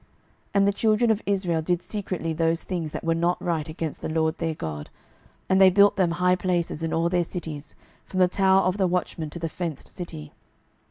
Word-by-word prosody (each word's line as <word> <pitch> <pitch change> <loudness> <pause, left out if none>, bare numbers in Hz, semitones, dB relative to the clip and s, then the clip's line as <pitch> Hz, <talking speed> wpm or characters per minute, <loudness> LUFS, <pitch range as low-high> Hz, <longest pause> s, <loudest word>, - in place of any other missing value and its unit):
12:017:009 - - -33 0.5
And 200 0 +4
the 200 - +2
children 220 +2 +2
of 220 0 0
Israel 185 -5 +1
did 175 +2 -1
secretly 185 -6 -3
those 165 +1 0
things 170 -4 -3
that - - -6
were 165 - +2
not 170 +2 +1
right 165 -3 -2
against 155 -1 -5
the - - -3
LORD 160 0 0
their 165 -1 -1
God, 75 - -6 0.6
and 190 0 +3
they 190 - +9
built 200 +2 +5
them 185 -4 +2
high 180 0 +3
places 175 -3 -1
in 165 -1 -2
all 165 +1 +1
their 175 0 +1
cities, 160 -4 -7 0.3
from 185 - -3
the 180 - +6
tower 190 +1 +3
of 185 +2 0
the 190 -2 +2
watchmen 175 -3 -2
to 160 - -8
the 165 -1 -3
fenced 165 -3 -5
city. 160 -5 -8
175 Hz, 215 wpm, -25 LUFS, 160-185 Hz, 0.6 s, they